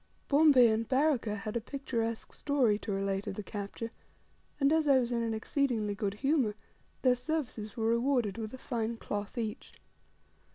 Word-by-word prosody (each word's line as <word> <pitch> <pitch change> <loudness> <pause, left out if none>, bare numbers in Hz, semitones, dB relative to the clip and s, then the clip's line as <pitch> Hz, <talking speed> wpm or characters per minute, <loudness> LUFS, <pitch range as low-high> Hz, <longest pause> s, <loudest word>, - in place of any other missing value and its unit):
Bombay 285 -4 +7
and 220 +1 0
Baraka 265 -6 +2
had 210 +2 -5
a 235 - 0
picturesque 230 -3 -3
story 255 -8 +2
to 215 - -5
relate 195 0 -1
of - - -3
the 210 - -5
capture; 205 +3 -5 0.7
and, 280 +1 +4
as 320 -1 +2
I 275 -2 +6
was 245 -1 0
in 235 -1 0
an 225 -1 -1
exceedingly 220 -3 0
good 200 0 -2
humour, 270 -3 +1 0.5
their 255 -1 +6
services 250 -5 -3
were 225 - -1
rewarded 235 -3 +1
with 220 -1 -4
a 260 - -8
fine 230 -3 -3
cloth 205 0 -5
each. 220 -2 -4
230 Hz, 170 wpm, -31 LUFS, 210-270 Hz, 0.7 s, Bombay